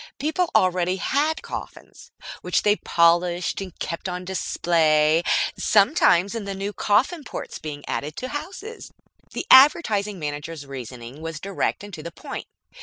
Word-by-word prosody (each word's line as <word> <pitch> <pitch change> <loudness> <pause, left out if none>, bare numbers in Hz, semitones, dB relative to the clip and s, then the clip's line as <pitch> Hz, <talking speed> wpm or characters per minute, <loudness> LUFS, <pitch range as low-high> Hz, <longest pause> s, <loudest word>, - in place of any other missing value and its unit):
People 315 +4 0
already 185 0 +2
had 290 - 0
coffins, - - -9 0.3
which - - 0
they 205 0 +4
polished 175 +1 +2
and 185 -3 -8
kept 165 +3 -4
on 180 0 -5
display, 160 -4 +2 0.4
sometimes 200 - +4
in 225 -3 -4
the 200 -1 -4
new 200 +2 -4
"Coffin 255 - +1
ports" - - -7
being 145 -2 -7
added 150 +2 -3
to 255 - -4
houses. 380 - -7 0.4
The - - -4
Advertising 220 - +6
Manager's 150 0 -5
reasoning 125 0 -9
was 165 -1 -5
direct 195 +2 -2
and 205 -1 -10
to 160 - -7
the 170 +2 -7
point. - - -8
185 Hz, 145 wpm, -23 LUFS, 160-215 Hz, 0.4 s, Advertising